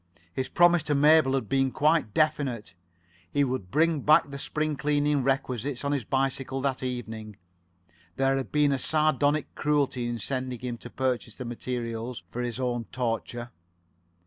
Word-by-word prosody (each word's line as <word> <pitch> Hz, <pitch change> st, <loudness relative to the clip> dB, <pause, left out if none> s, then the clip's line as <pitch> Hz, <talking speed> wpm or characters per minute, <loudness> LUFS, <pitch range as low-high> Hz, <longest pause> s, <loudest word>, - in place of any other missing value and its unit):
His 130 Hz, -, -3 dB
promise 175 Hz, -1 st, +5 dB
to 150 Hz, -1 st, 0 dB
Mabel 150 Hz, -1 st, +5 dB
had 130 Hz, -6 st, -2 dB
been 135 Hz, +3 st, +2 dB
quite 150 Hz, -3 st, +2 dB
definite. 135 Hz, -, 0 dB, 0.6 s
He 145 Hz, -, +2 dB
would 130 Hz, -8 st, -2 dB
bring 160 Hz, -, +2 dB
back 150 Hz, 0 st, +4 dB
the 140 Hz, -, -6 dB
spring 155 Hz, +1 st, -1 dB
cleaning 145 Hz, +1 st, +1 dB
requisites 130 Hz, 0 st, -1 dB
on 140 Hz, -, 0 dB
his 140 Hz, -6 st, -1 dB
bicycle 135 Hz, 0 st, -1 dB
that 135 Hz, -1 st, -1 dB
evening. 110 Hz, -4 st, -5 dB, 0.8 s
There 135 Hz, 0 st, +2 dB
had 135 Hz, -1 st, -3 dB
been 150 Hz, -1 st, +3 dB
a 135 Hz, -, 0 dB
sardonic 155 Hz, 0 st, +1 dB
cruelty 140 Hz, -5 st, 0 dB
in 120 Hz, 0 st, -2 dB
sending 130 Hz, +2 st, -3 dB
him 120 Hz, -2 st, -4 dB
to 120 Hz, -, -10 dB
purchase 125 Hz, -4 st, -2 dB
the 125 Hz, -, -7 dB
materials 120 Hz, 0 st, -4 dB
for 125 Hz, -, -3 dB
his 120 Hz, 0 st, -3 dB
own 120 Hz, -2 st, -1 dB
torture. 120 Hz, +1 st, -3 dB
130 Hz, 160 wpm, -27 LUFS, 120-145 Hz, 0.8 s, promise